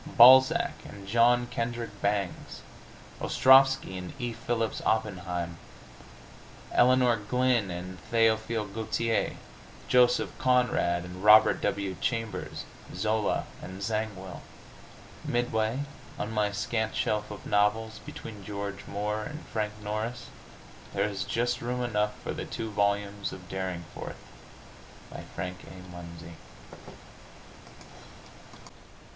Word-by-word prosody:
Balzac 130 +2 +8
and 100 -1 -11
John 120 +3 +4
Kendrick 115 -3 -4
Bangs; 100 -2 -2 0.6
Ostrovsky 135 -7 +5
and 90 -1 -7
E. 120 -2 -2
Phillips 115 -1 -2
Oppenheim; 90 -6 -1 1.1
Elinor 125 -1 +4
Glyn 120 0 +1
and 90 +1 -6
Théophile 110 -2 +2
Gautier; 115 +1 0 0.5
Joseph 125 -1 +3
Conrad 125 -9 +2
and 90 +1 -9
Robert 105 +1 +7
W. 100 -2 -1
Chambers; 115 -5 -2 0.3
Zola 110 +3 0 0.2
and 95 +2 -7
Zangwill!... 100 -5 -3 0.8
Midway 120 +1 0 0.4
on 105 - -3
my 105 -2 +1
scant 110 +2 -2
shelf 105 0 0
of 105 - -9
novels, 105 +2 +1
between 105 -3 -9
George 100 0 -5
Moore 105 +1 -2
and 150 +2 -8
Frank 105 -1 -2
Norris, 110 +4 -4 0.7
there - - +2
is 100 -2 -3
just 120 +4 -1
room 125 +1 -2
enough 105 -3 -1
for - - -3
the - - -5
two 110 -1 -5
volumes 100 0 0
of 90 -1 -10
"Derringforth," 95 -3 -5 0.9
by - - -8
Frank 90 +1 -4
A. 90 -1 -11
Munsey. 85 -1 -10
105 Hz, 105 wpm, -28 LUFS, 95-115 Hz, 1.1 s, Balzac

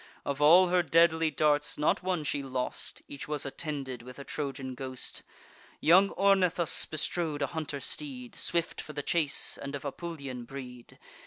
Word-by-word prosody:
Of 140 +1 -2
all 175 +5 +7
her 180 0 +4
deadly 165 0 +4
darts, 150 0 +1
not 150 - +2
one 180 -3 -1
she 145 -1 -1
lost; 130 -2 -4
Each 140 - -7
was 150 -1 -1
attended 135 -3 -4
with 125 +1 -11
a 140 - -7
Trojan 135 -3 -4
ghost. 130 0 -6 0.6
Young 185 +5 +6
Ornithus 185 -4 +3
bestrode 155 0 0
a - - +3
hunter 155 -3 -4
steed, 250 - -4
Swift 170 -4 -1
for 150 - -9
the 145 0 -4
chase, 150 -4 +1
and 140 +1 -4
of 140 - -7
Apulian 140 -5 -6
breed. 125 -2 -10
150 Hz, 160 wpm, -30 LUFS, 135-170 Hz, 0.6 s, all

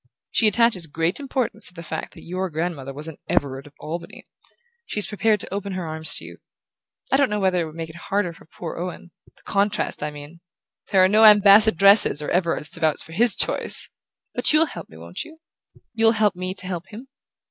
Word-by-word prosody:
She 225 - +4
attaches 215 -5 +2
great 165 - -1
importance 260 -6 -2
to 180 - -6
the 170 - -9
fact 160 -1 -6
that - - -13
your 185 +2 -4
grandmother 160 -4 -4
was 150 +3 -7
an 160 - -9
Everard 135 0 -1
of 145 - -18
Albany. 170 +2 -8 0.6
She's 210 - -1
prepared 215 0 0
to - - -5
open 200 -1 -4
her 185 -2 -4
arms 160 0 +1
to - - +2
you. - - -11 0.7
I 270 - +4
don't 280 -1 +2
know 210 0 -2
whether 190 -2 +1
it - - -2
won't 155 +1 -11
make 165 -1 -6
it - - -17
harder 185 0 -2
for - - -18
poor 165 +1 -8
Owen... 175 0 -7 0.2
the - - -24
contrast, 205 +1 -1
I 150 - -2
mean...There 170 +5 -4
are - - +6
no 210 +3 +3
Ambassadresses 205 -4 +6
or 150 - -5
Everards 170 -4 0
to 165 - -7
vouch 155 -2 0
for - - -14
HIS 230 +7 +3
choice! - - +3 0.4
But - - +3
you'll 310 +1 +4
help - - -9
me, 80 - -15
won't 85 +2 -7
you? 320 - -15 0.6
You'll 225 0 +4
help 210 -3 +1
me 185 +1 -5
to 190 - -2
help 180 -1 -5
him? 230 +5 -11
180 Hz, 210 wpm, -22 LUFS, 160-210 Hz, 0.7 s, are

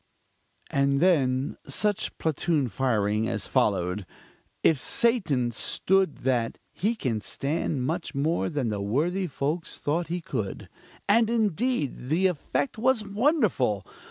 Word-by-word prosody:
And 140 0 +2
then 140 -6 +2
such 210 -2 +1
platoon 155 -3 0
firing 110 -2 0
as - - -2
followed! 90 +2 0 0.6
If 155 -4 +4
Satan 165 - +1
stood 190 - +1
that, 120 -3 +1
he 220 +5 -1
can 115 - -2
stand 140 +1 -2
much 160 +1 -3
more 155 +5 0
than 145 -8 -1
the 105 -2 -2
worthy 165 - 0
folks 155 +3 -3
thought 165 +4 -1
he 175 +2 -2
could. 115 - -4 0.4
And, 225 +2 +4
indeed, 220 - 0
the 170 +5 +2
effect 190 - -1
was 245 -2 +2
wonderful! 200 - +1
155 Hz, 125 wpm, -27 LUFS, 125-195 Hz, 0.6 s, If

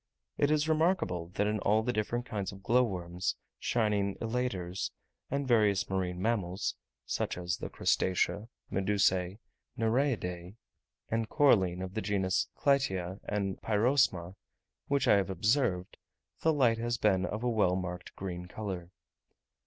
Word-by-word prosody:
It 145 - +2
is 155 0 +2
remarkable 155 - +1
that 105 - +2
in 105 0 0
all 105 +3 +2
the 125 +1 0
different 120 +3 -1
kinds 100 -4 -3
of 95 -1 -12
glowworms, 95 -7 +1 0.2
shining 105 -4 +1
elaters, 110 -7 -2 0.4
and 140 0 -1
various 105 -5 +3
marine 90 -1 -1
animals 95 -5 0 0.3
(such - - -2
as 90 +1 -2
the - - -5
crustacea, 100 +4 +1 0.2
medusae, 95 -1 +1 0.4
nereidae, 110 -7 0 0.6
a 115 0 +1
coralline 95 - +3
of 95 0 -6
the 110 - -2
genus 95 -2 +1
Clytia, 95 -10 +1
and 100 -2 -2
Pyrosma), 110 -5 +2 0.5
which 140 -1 +1
I - - +6
have 100 -1 0
observed, 95 -1 +1 0.4
the 160 - +3
light 120 -7 +3
has 120 +1 -1
been 95 -4 +2
of 110 +5 -4
a - - +1
well 105 -5 +3
marked 90 -1 -5
green 90 -2 -5
colour. 90 -3 -5
100 Hz, 135 wpm, -31 LUFS, 90-120 Hz, 0.6 s, I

